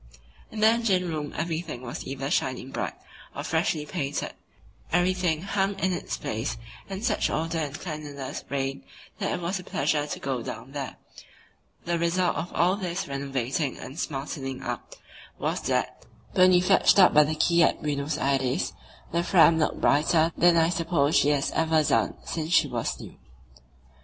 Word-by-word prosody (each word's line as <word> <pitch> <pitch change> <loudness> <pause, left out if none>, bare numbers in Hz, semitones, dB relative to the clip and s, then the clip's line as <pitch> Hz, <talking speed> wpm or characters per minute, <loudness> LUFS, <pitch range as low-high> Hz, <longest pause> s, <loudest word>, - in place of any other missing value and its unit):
In 215 - -6
the 215 - +7
engine 220 -6 +2
room 155 -3 -3
everything 160 -5 -3
was 120 - -6
either 135 +1 -4
shining 130 0 -1
bright - - -3 0.4
or - - -4
freshly 150 -2 0
painted, 145 -4 -3 0.6
everything 175 -2 +1
hung 195 0 0
in 190 -1 +1
its - - -3
place 115 +5 -3 0.3
and 195 +3 -4
such 220 -4 +1
order 165 +1 -1
and 145 -1 -4
cleanliness 150 -5 -6
reigned 135 -6 -2 0.4
that - - -1
it - - -1
was 180 +3 -2
a - - -9
pleasure 145 -1 0
to - - -5
go 130 -3 -2
down 130 +3 -7
there. 140 -2 -5 0.9
The 170 0 0
result 175 +2 +1
of 170 +2 -4
all 180 +3 +2
this 185 -1 -3
renovating 140 0 -2
and 140 +6 -8
smartening 135 -3 -4
up - - -5 0.4
was - - -2
that, - - -1 0.3
when 185 0 +6
we 180 -1 +5
fetched 195 +2 +4
up 185 -2 +7
by 150 - +7
the 155 +2 -2
quay 170 +2 +3
at - - +2
Buenos 145 0 -1
Aires, 135 -3 0 0.4
the 170 - +1
Fram 170 -2 +5
looked 155 - 0
brighter 155 +3 +3
than 175 -1 +5
I 165 0 +4
suppose 165 -4 +1
she 145 - +4
has 145 -2 +1
ever 160 -1 +2
done 150 - +1
since 160 0 -3
she - - +5
was - - -3
new. - - -11
160 Hz, 170 wpm, -26 LUFS, 140-175 Hz, 0.9 s, the